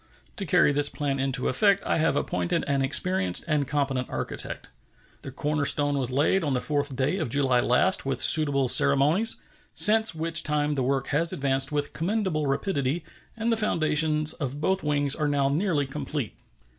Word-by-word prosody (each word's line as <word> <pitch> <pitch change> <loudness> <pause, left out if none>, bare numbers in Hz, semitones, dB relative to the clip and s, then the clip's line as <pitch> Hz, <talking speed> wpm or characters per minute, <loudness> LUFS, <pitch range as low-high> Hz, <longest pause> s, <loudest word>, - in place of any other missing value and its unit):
To 195 -4 -4
carry 145 - +3
this 145 0 +4
plan 140 -3 -3
into 135 -1 -2
effect 200 +7 +2
I - - 0
have 160 +1 +1
appointed 90 -1 -2
an 140 -1 -1
experienced 135 - 0
and 150 -4 0
competent 135 -3 -2
architect. - - -5 0.5
The - - -8
corner 150 +3 -3
stone 145 +1 +2
was 125 -2 -2
laid 150 +8 +1
on 145 -4 -1
the - - 0
4th 145 -1 -2
day 135 +8 -1
of 155 - -3
July 135 -2 +1
last 125 +10 +1
with 135 -1 -3
suitable 140 -4 +4
ceremonies, 155 - +3 0.3
since 220 -3 +4
which 165 0 +1
time 150 0 0
the 140 -3 -2
work 135 +1 -2
has 165 +4 +3
advanced 135 0 0
with 145 -1 -3
commendable 180 -4 -2
rapidity, 140 0 -2 0.3
and 230 +1 -1
the 225 - +1
foundations 155 -6 0
of 140 0 -5
both 190 +5 -1
wings 145 -2 0
are 150 - -2
now 140 -1 0
nearly 155 -1 -1
complete. 140 -2 -5
145 Hz, 175 wpm, -25 LUFS, 135-160 Hz, 0.5 s, this